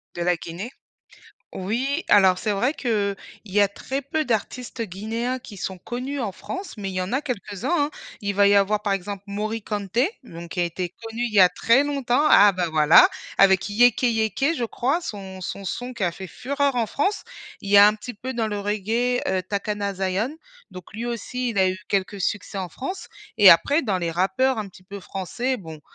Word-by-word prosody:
De 175 - -4
la 180 0 +2
Guinée? 175 +9 -7 0.8
Oui, 255 - -2
alors, 190 -3 +5
c'est 210 +2 -1
vrai 245 +9 0
qu'il 210 -7 -1 0.3
y 205 -1 -2
a 200 - +6
très 265 +7 -5
peu 310 +3 -2
d'artistes 240 +1 -3
guinéens 225 +6 -3
qui 230 -5 -11
sont 190 0 -5
connus 255 +7 -5
en 220 - -2
France, 375 - -7
mais 195 -2 -4
il - - -7
y 185 - -1
en 185 - -5
a 265 - 0
quelques-uns, 250 - -3
hein. 300 - -8 0.3
Il 200 -1 -3
va 200 0 +5
y 200 - +5
avoir, 205 +1 +3
par 200 - 0
exemple, 195 +1 -4
Morikante, 210 0 -4 0.2
donc, 170 -7 -10
qui 180 - -2
a - - +3
été 175 +1 -4
connu 225 +1 -4
il 235 - -3
y 200 - +6
a 180 - +8
très 230 +8 +3
longtemps, 280 -2 0
ah 205 0 +7
bah, 180 -2 -1
voilà, 155 +1 +7 0.3
avec 190 0 +4
Yéké 240 +3 +4
Yéké, 225 - 0
je 245 - -2
crois, 265 +8 -1
son 195 - -7
son 195 +2 -6
son 245 +6 -4
qui 225 -6 -2
a 175 - 0
fait 190 +1 -8
fureur 280 - -1
en 230 - +1
France. 390 - -1 0.4
Il 200 - -7
y 205 - +5
a 200 - +10
un 210 - +1
petit 245 +4 -8
peu, 260 +5 -6
dans 230 -2 -1
le 205 -1 -3
reggae, 220 +5 0
heu, 190 -1 0
Takana 200 +1 -3
Zion, 195 +9 -2 0.3
donc 185 -1 -11
lui 225 +3 -5
aussi 240 +1 -3
il 205 - -3
a 190 -1 +4
eu 185 0 -3
quelques 195 0 -1
succès 200 +1 -2
en 185 -2 -3
France. 275 - -6 0.3
Et - - +10
après, 290 +3 +4
dans 200 -6 0
les 170 -1 -2
rappeurs 195 +9 +1
un 210 -2 -4
petit 185 0 -18
peu 200 +1 -9
français, 240 +9 -3
bon, 160 -6 -10
210 Hz, 215 wpm, -23 LUFS, 190-245 Hz, 0.8 s, a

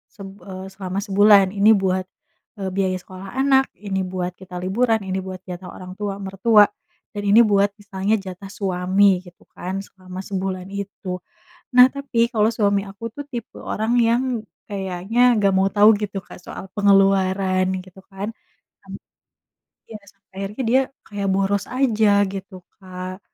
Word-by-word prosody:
seb 195 -2 -9 0.2
eee, 185 0 -7
selama 195 0 -4
sebulan, 200 -1 +6
ini 205 +2 +5
buat, 185 -1 0 0.5
eee, 195 -1 -3
biaya 190 -1 +1
sekolah 185 +1 -10
anak, 270 -1 +4 0.2
ini 190 -1 -1
buat 180 -1 -3
kita 185 -1 -11
liburan, 220 +4 +1
ini 190 0 -1
buat 185 -1 -7
jatah 180 +1 -7
orang 185 0 -9
tua 205 -1 -3
mertua, 205 +3 +4 0.5
dan 205 - -5
ini 220 +4 +8
buat 205 -3 +3
misalnya 200 +1 -2
jatah 190 +1 -8
suami 190 0 +2 0.2
gitu 175 0 -16
kan, 185 +1 -5
selama 185 -2 -11
sebulan 190 -1 -4
itu. 195 -2 -5 0.6
Nah, 250 - +11
tapi 280 -4 -3
kalau 215 0 +3
suami 200 -2 +2
aku 200 +3 -14
tuh 290 - -5
tipe 235 -2 -7
orang 220 +2 -2
yang 235 +1 +3 0.4
kayaknya 195 +2 -3 0.2
nggak 200 -2 +3
mau 190 +1 +3
tahu 210 +1 +6
gitu, 205 -1 -3
Kak, - - -12
soal 180 - -8
pengeluaran 195 -2 +3 0.2
gitu 185 +1 -15
kan. 195 +1 -5 0.6
Sam - - -11 1.0
iya, 220 - -7
sampai 200 +1 -26
akhirnya 200 +6 -4
dia 260 - +5 0.2
kayak 200 -2 -4
boros 195 +1 +1
aja 225 -5 +3 0.2
gitu, 195 0 -7 0.3
Kak. 185 0 -7
195 Hz, 155 wpm, -22 LUFS, 185-210 Hz, 1.0 s, Nah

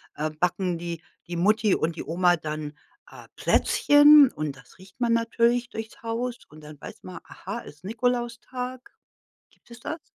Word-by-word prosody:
äh, 155 +1 -2
backen 175 +3 -1
die 170 -1 -6 0.3
die 175 - -5
Mutti 210 +4 +3
und 165 +1 -1
die - - -5
Oma 175 +2 +2
dann, 155 -1 -5 0.4
äh, - - -13
Plätzchen 290 -1 +6
und 150 -2 -4
das 130 -3 -19
riecht 185 +4 -18
man 240 -1 +2
natürlich 235 +1 +1
durchs 220 -2 -8
Haus 235 +2 -3
und 155 +2 -15
dann 150 -1 -12
weiß - - -11
man, 185 -2 -9
aha, 200 +5 -7
ist 150 -8 -14
Nikolaustag? 245 +3 -3 0.6
Gibt - - -29
es 235 0 -12
das? 315 +7 -5
205 Hz, 165 wpm, -25 LUFS, 165-240 Hz, 0.6 s, Plätzchen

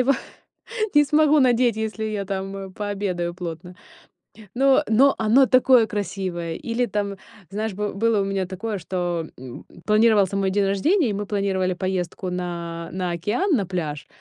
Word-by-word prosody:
его 265 +2 +4 0.8
не 295 0 +6
смогу 300 +1 +4
надеть, 245 -3 +3
если 220 0 -3
я 210 -2 -2
там, 195 0 -4
э, 195 -1 -7
пообедаю 190 -4 -3
плотно. 175 0 -7 0.8
Но 275 +3 +4
но 270 +5 +5
оно 225 +5 +4
такое 255 -1 +5
красивое! 185 -5 -4
Или 240 +1 -1
там, 200 0 -2 0.3
знаешь, 215 +1 -3
бы 210 +1 -3
было 220 0 +1
у - - -1
меня 195 -1 -1
такое, 200 +3 -4
что, 175 -2 -3
м, 125 -1 -10 0.2
планировался 210 -3 +3
мой 195 -1 +1
день 200 0 +1
рождения, 255 - +2
и - - -1
мы 205 +1 -3
планировали 195 -2 0
поездку 185 -1 -3
на 170 -2 -5
на 180 -1 -2
океан, 210 - -1
на 200 -5 0
пляж. 160 -5 -4
200 Hz, 160 wpm, -23 LUFS, 180-225 Hz, 0.8 s, не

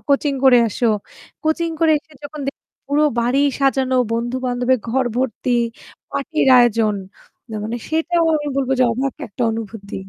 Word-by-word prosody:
Coaching 280 0 +2
করে 255 -2 +7
আসো। 220 - -3 0.6
Coaching 330 +2 0
করে 320 -1 +4
এসে 310 +1 -24
যখন 295 +1 -7
দে - - +1 0.4
পুরো 290 +1 +2 0.2
বাড়ি 245 +3 +1 0.2
সাজানো 265 -1 +2 0.2
বন্ধু-বান্ধবের 245 +1 0
ঘর 260 +2 +1
ভর্তি; 255 -1 -1 0.6
পার্টির 280 0 0
আয়োজন 225 -3 +3 0.5
না - - -6
মানে 225 +2 -3
সেটাও 330 +1 +1
আমি 295 -1 -4
বলবো 265 -1 0
যে - - +6
অবাক 265 +3 -2
একটা 220 +4 -5
অনুভূতি। 220 -2 -7
260 Hz, 150 wpm, -20 LUFS, 235-290 Hz, 0.6 s, করে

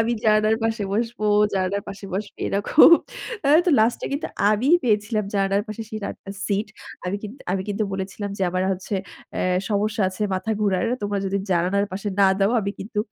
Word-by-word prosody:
আমি 230 +1 +1
জানালার 215 0 +4
পাশে 225 -2 0
বসব, 230 +3 -1 0.4
জানালার 195 +1 0
পাশে 200 0 -8
বসবি 205 +1 -5
না 200 - +3
খুব 315 - +8 0.6
আ - - +3 0.2
তো - - +4
লাস্ট 230 +2 +2
এ - - -1
কিন্তু 285 - -2 0.2
আমি 215 +5 +1 0.2
পেয়েছিলাম 215 -1 +1
জানালার 195 +1 +1
পাশে 215 +1 -5
শিট 215 -1 -5
আ - - -5 0.3
সিট। 205 +1 -1 0.4
আমি 195 +3 -1
কিন্তু 220 +6 -8
আমি 190 -1 -1
কিন্তু 205 +1 -1
বলেছিলাম 195 +1 -4
যে - - -1
আমার 185 +1 0
হচ্ছে 190 +2 -5 0.4
অ্যাঁ 180 0 +1
সমস্যা 210 +1 0
আছে 190 +3 -5
মাথা 185 +4 -3
ঘুরার। 200 0 +1 0.2
তোমরা 205 0 -1
যদি 200 +1 0
জানালার 185 +3 +2
পাশে 200 +2 -3
না 195 - +7
দাও 195 +1 +3
আমি 200 0 -2
কিন্তু 210 +1 -5
205 Hz, 190 wpm, -23 LUFS, 195-215 Hz, 0.6 s, খুব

